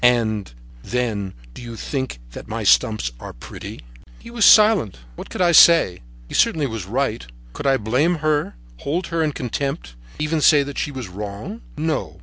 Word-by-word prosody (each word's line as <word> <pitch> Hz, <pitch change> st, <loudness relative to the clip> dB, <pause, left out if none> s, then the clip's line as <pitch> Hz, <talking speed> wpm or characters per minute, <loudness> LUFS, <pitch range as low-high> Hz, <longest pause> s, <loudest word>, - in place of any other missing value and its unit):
And, 110 Hz, -, +2 dB, 0.3 s
then, 110 Hz, -, -3 dB, 0.2 s
do -, -, -11 dB
you 120 Hz, -1 st, -8 dB
think 130 Hz, -, -4 dB
that -, -, -10 dB
my -, -, -4 dB
stumps 110 Hz, -, +3 dB
are -, -, -9 dB
pretty?" -, -, -10 dB, 0.4 s
He 235 Hz, -, -13 dB
was 235 Hz, -3 st, +2 dB
silent. 210 Hz, -, +5 dB, 0.2 s
What -, -, -9 dB
could 185 Hz, -, -1 dB
I 175 Hz, -, +4 dB
say? 165 Hz, -, +6 dB, 0.3 s
He -, -, -11 dB
certainly 155 Hz, -3 st, +2 dB
was 110 Hz, -7 st, -5 dB
right. 120 Hz, 0 st, -1 dB, 0.3 s
Could -, -, -4 dB
I 135 Hz, -1 st, +4 dB
blame 130 Hz, +11 st, +1 dB
her, 150 Hz, -, 0 dB, 0.2 s
hold 165 Hz, -, -3 dB
her 165 Hz, -, +1 dB
in 155 Hz, -1 st, +1 dB
contempt, 125 Hz, -, -4 dB, 0.2 s
even 150 Hz, +1 st, -1 dB
say 145 Hz, -1 st, +5 dB
that 140 Hz, 0 st, -6 dB
she -, -, -2 dB
was 130 Hz, -6 st, -6 dB
wrong? 105 Hz, -, -7 dB, 0.2 s
No. 150 Hz, -, -3 dB
130 Hz, 175 wpm, -21 LUFS, 105-155 Hz, 0.4 s, say